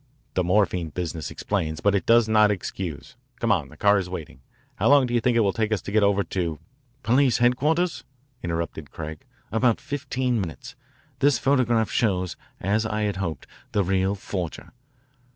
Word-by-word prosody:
The 90 - +1
morphine 90 -2 +1
business 80 -1 -4
explains, 80 -7 -2
but 100 +4 +2
it 100 - 0
does 115 -1 +5
not 110 -1 +5
excuse. 95 -5 -4 0.2
Come 115 - +1
on, 80 -10 +1
the - - -15
car 100 0 +4
is 90 -2 -4
waiting. 85 -8 -7 0.4
How - - +2
long 140 -2 +6
do 120 - -4
you 120 - +2
think 120 0 +2
it - - +5
will 100 -3 +2
take 110 -1 -1
us 110 - +1
to - - -6
get 110 +1 +3
over 100 0 +3
to 85 -6 -2 0.2
" 130 0 -39
"Police 130 +1 +3
headquarters?" 135 +4 +1 0.4
interrupted 85 -3 -4
Craig. 80 -1 -7 0.3
"About 115 +1 +2
fifteen 130 -4 -2
minutes. 80 -9 -7 0.5
This 140 -3 +4
photograph 120 -4 +2
shows, 95 -6 0 0.2
as 105 +4 +1
I 110 -1 -2
had 105 -2 -1
hoped, 85 -8 -4 0.3
the 100 - +2
real 95 +1 +1
forger. 90 -4 -5
105 Hz, 180 wpm, -25 LUFS, 90-120 Hz, 0.5 s, long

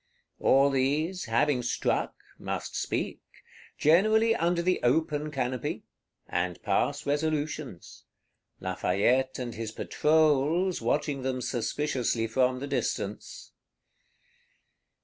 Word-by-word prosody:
All 140 +1 +4
these, 150 +7 0
having 125 +3 +2
struck, 120 - -1 0.2
must - - -4
speak; - - -2 0.6
generally 215 +8 +4
under 170 -3 +1
the 185 +1 +1
open 150 +3 +1
canopy; 130 -4 -3 0.4
and 90 0 -2
pass - - 0
resolutions;—Lafayette 130 - -2
and 120 -2 -4
his 110 -1 -5
Patrols 155 +6 +2
watching 140 +3 0
them 130 0 -2
suspiciously 125 -1 -1
from 125 +3 +1
the - - -3
distance. 140 - -4
140 Hz, 90 wpm, -28 LUFS, 125-155 Hz, 0.6 s, All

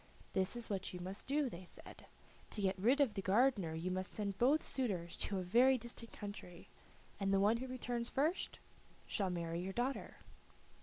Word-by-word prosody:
"This 190 +4 +1
is 240 -1 -3
what 195 -2 -2
you - - -5
must 185 +3 -6
do," 285 +1 +2
they 185 -6 -7
said. 180 - -12 0.4
"To 210 - -2
get 190 0 +2
rid 245 +9 +4
of 270 -7 +4
the 195 - -2
gardener 195 -4 +3
you 175 +3 -2
must 185 0 -2
send 200 -2 -3
both 280 +6 +4
suitors 190 -10 -1
to 200 - -1
a 185 - -1
very 245 +8 +5
distant 235 -1 -7
country, 200 -4 -8 0.5
and 195 -1 +1
the 195 - +4
one 210 +4 +4
who 260 +2 -4
returns 245 -2 -2
first 310 +7 0 0.5
shall 195 -4 0
marry 170 -1 -2
your 190 +1 -4
daughter." 250 +4 -2
205 Hz, 190 wpm, -37 LUFS, 185-245 Hz, 0.5 s, very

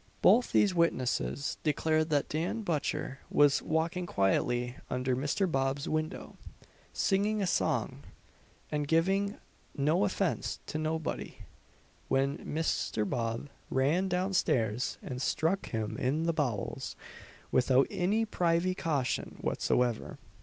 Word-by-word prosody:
Both 235 +6 +5
these 200 -3 +4
witnesses 145 -4 0
declared 155 +1 +1
that 145 -2 +1
Dan 175 +9 -2
Butcher 145 -5 -2
was 145 -1 +4
walking 165 +3 -1
quietly 120 - +1
under 125 0 0
Mr. 145 +9 0
Bob's 135 +1 0
window, 155 +1 -3 0.5
singing 205 +2 +1
a 200 - +1
song, - - 0 0.7
and 150 -1 -1
"giving 195 +6 +2 0.4
no 155 +7 +2
offence 195 -2 -1
to 155 - -4
nobody," 160 0 -3 0.7
when 135 +1 +1
Mr. 150 -8 -1
Bob 115 +5 -2 0.2
ran 150 +9 +2
down 185 +2 0
stairs, 120 - +1
and 125 -1 -5
struck 165 +7 0
him 110 -2 -3
in 145 +6 0
the 165 0 +1
bowels 125 -11 -2 0.6
"without 130 +1 +4
any 200 +3 +1
privy 175 -2 +1
cation 150 -8 -1
whatsoever." 120 -2 0
155 Hz, 115 wpm, -31 LUFS, 130-180 Hz, 0.7 s, Both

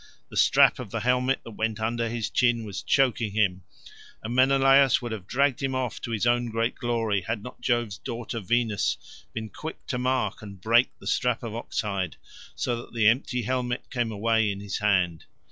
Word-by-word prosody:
The - - -11
strap - - +5
of - - -6
the - - -3
helmet 125 +2 +1
that 115 - -9
went 110 0 -2
under 115 +1 -1
his 115 -1 -3
chin 120 -2 +2
was 100 -2 -5
choking 120 -6 +1
him, 95 -4 +1 0.6
and 110 +2 -4
Menelaus 135 +1 +5
would 120 -1 -6
have 100 -4 -6
dragged 135 +1 +1
him 135 -1 -1
off 130 -3 -3
to - - -5
his 115 -1 -1
own 120 0 +2
great 115 +2 0
glory 115 -4 -1
had 105 +2 -4
not 125 - -10
Jove's 120 -5 0
daughter 115 0 -5
Venus 110 -5 0 0.3
been 110 -1 -5
quick 160 +1 -8
to 125 - -3
mark 125 -5 0
and 100 -3 -10
to 95 - -15
break 120 +2 +5
the - - -15
strap 125 0 0
of 115 -2 -5
ox 115 - -3
hide, 100 -4 -3 0.4
so 105 +11 -1
that 120 - -10
the 110 -2 +2
empty 125 +1 +2
helmet 125 +1 -2
came 120 -3 -1
away 110 +1 +1
in 100 - -5
his 100 -1 -4
hand. 95 -6 +1
115 Hz, 200 wpm, -26 LUFS, 105-125 Hz, 0.6 s, strap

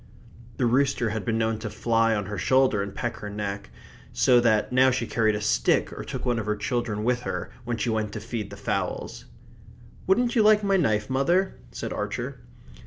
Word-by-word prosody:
The 125 - +1
rooster 125 -1 +2
had 110 -1 -4
been 115 -2 0
known 110 -1 0
to 110 0 -5
fly 115 +1 +1
on 105 -2 -2
her 100 0 -5
shoulder 130 -6 +3
and 100 0 -5
peck 120 - -3
her 105 - -7
neck, 100 -1 -5 0.4
so 125 -1 +4
that 110 -2 +2
now 130 +1 +5
she 125 -2 -1
carried 110 -2 +1
a 105 - -3
stick - - +1
or - - -6
took - - -6
one 120 -2 +1
of 110 - -5
the 105 - +1
children 105 -1 -2
with 125 +1 +1
her 125 - -4
when 120 0 -2
she 115 - -1
went 110 -1 -1
to 105 - -4
feed 110 -1 -5
the - - -10
fowls. - - -3 0.8
"Wouldn't 240 +6 +2
you 230 - +5
like 215 0 +5
my 195 -1 +2
knife, 110 - +1
mother?" 170 +9 +1 0.2
said - - -5
Archer. - - -4
115 Hz, 205 wpm, -26 LUFS, 105-130 Hz, 0.8 s, now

